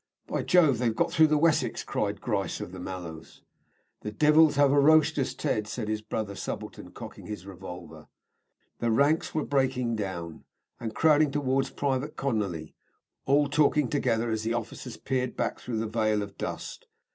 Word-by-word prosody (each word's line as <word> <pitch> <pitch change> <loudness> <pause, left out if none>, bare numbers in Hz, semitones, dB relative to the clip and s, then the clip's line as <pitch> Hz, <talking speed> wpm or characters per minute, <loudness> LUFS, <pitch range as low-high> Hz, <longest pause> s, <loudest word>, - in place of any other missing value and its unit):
"By - - -2
Jove, 155 -9 +4
they've 115 -3 +1
got 170 +5 +1
through 160 -2 +5
the 155 0 +2
Wessex!" 160 +1 +2
cried - - -2
Grice - - -2
of - - -6
the 95 - -8
Mallows. 90 -3 -8 0.6
"The 105 - -5
divils 150 +5 +5
have 145 -1 +4
hurrooshed 155 +2 +5
us, 135 - -1
Ted," 105 -1 -1
said 110 -1 -4
his 110 0 -1
brother 110 -1 -4
subaltern, - - -6
cocking - - -10
his 105 -4 -6
revolver. 90 -4 -10 0.7
The 120 - 0
ranks 140 +10 +2
were 155 - 0
breaking, 125 -5 0
and 95 +4 -7
crowding 155 -1 +4
towards 135 -1 0
Private 140 +1 -2
Conolly, 100 - -2 0.5
all 145 +2 +4
talking 145 -2 +2
together 120 -5 0
as 110 -1 -1
the 115 +1 -1
officers 120 +1 -6
peered 130 -2 -2
back - - -1
through 120 -3 -4
the 110 - -1
veil 110 -1 0
of 100 -1 -9
dust. - - -6
125 Hz, 165 wpm, -28 LUFS, 105-145 Hz, 0.7 s, through